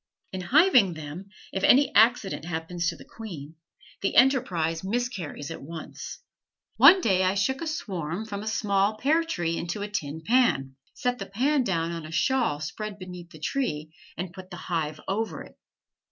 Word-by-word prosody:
In 185 - -3
hiving 250 - +5
them, 155 +5 -8 0.2
if 190 - -2
any 275 +3 +5
accident 220 -6 +4
happens 170 +1 -3
to 170 - -5
the - - -14
queen 165 -10 -9 0.5
the 195 - -1
enterprise 180 - +3
miscarries 195 - -3
at - - -7
once. 160 +3 -8 0.6
One 385 - +8
day 190 - +2
I 185 +1 +2
shook 265 +9 0
a 330 - -3
swarm 190 - -3
from 200 -2 -5
a 215 - -7
small 210 -1 +1
pear 310 +8 +2
tree 175 - -2
into 175 +5 -3
a - - -3
tin 160 -5 -4
pan, 220 - +2 0.2
set 250 0 -1
the 195 - -5
pan 265 +7 +1
down 170 -6 -1
on 165 -2 -5
a - - -10
shawl 235 - +1
spread 205 +7 -5
beneath 180 -2 -9
the 155 - -13
tree, 155 - -2 0.2
and 180 0 -5
put 185 0 -11
the 175 - -8
hive 160 -4 -3
over 195 -4 -2
it. - - -16
190 Hz, 175 wpm, -27 LUFS, 165-230 Hz, 0.6 s, One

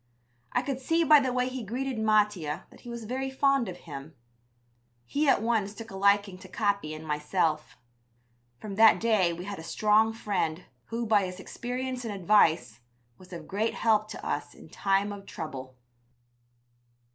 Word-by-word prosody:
I - - +1
could 270 -2 -3
see 330 +5 +1
by 300 -1 +7
the 260 -2 0
way 250 0 0
he 255 -1 -5
greeted 250 +3 -3
Mattia 210 -8 +1
that - - -16
he 240 - -11
was 235 -1 -6
very 260 +4 -3
fond 270 -4 +2
of 180 - -7
him. 145 -2 -9 0.9
He 290 - +1
at 220 - +3
once 215 -3 0
took 225 0 -9
a - - -8
liking 200 -1 +2
to 185 - -12
Capi 200 -5 -1
and 155 +1 -9
myself. 155 0 -1 0.8
From 200 - -7
that 220 -1 +7
day 215 -6 +3
we 175 +2 -6
had 200 -2 -6
a - - -8
strong 215 +5 +3
friend, 185 -7 -2 0.2
who, 230 +1 -3
by 210 -3 +3
his 180 +1 -8
experience 250 +4 -4
and 225 - -4
advice, 160 - +3 0.4
was 185 0 -16
of 170 -3 -8
great 215 +3 -1
help 215 -2 +2
to - - -8
us - - -3
in - - -15
time 195 +1 0
of 200 -1 -11
trouble. 130 -5 -7
205 Hz, 175 wpm, -28 LUFS, 180-235 Hz, 0.9 s, by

